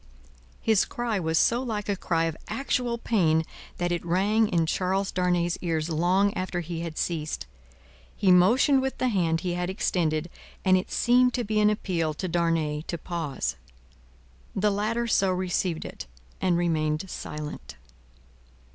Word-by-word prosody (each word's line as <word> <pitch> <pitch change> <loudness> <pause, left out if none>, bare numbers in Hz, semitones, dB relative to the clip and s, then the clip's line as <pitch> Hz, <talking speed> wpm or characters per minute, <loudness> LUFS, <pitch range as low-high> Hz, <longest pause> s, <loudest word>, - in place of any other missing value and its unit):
His 220 -3 +4
cry 235 -4 -2
was 160 -2 0
so 235 +7 +3
like 215 -5 -3
a 200 - +1
cry 165 -3 0
of 165 -1 -1
actual 240 0 -1
pain, 165 -9 +2 0.3
that 175 0 -1
it 175 - -1
rang 200 +6 +2
in 170 -4 +1
Charles 190 +3 0
Darnay's 175 -2 0
ears 165 -2 -1
long 185 +5 +2
after 185 -1 -2
he 170 0 -5
had 165 -2 -5
ceased. 155 - -2 0.7
He 190 - +3
motioned 245 +10 +5
with 265 0 -2
the 255 - +1
hand 170 -6 +1
he 180 -1 -2
had 180 +1 -2
extended, 170 -4 0 0.3
and 185 -1 +6
it 185 - -1
seemed 250 +1 +3
to 245 - -1
be 215 0 0
an 210 0 +5
appeal 170 -7 -1
to 185 - -3
Darnay 165 -3 0
to 170 - -3
pause. 160 - -3 1.0
The 205 +2 +2
latter 215 +4 0
so 195 -4 +2
received 180 -2 -1
it, - - -8 0.3
and 180 -2 +2
remained 155 0 0
silent. 150 -4 -7
180 Hz, 155 wpm, -26 LUFS, 165-210 Hz, 1.0 s, and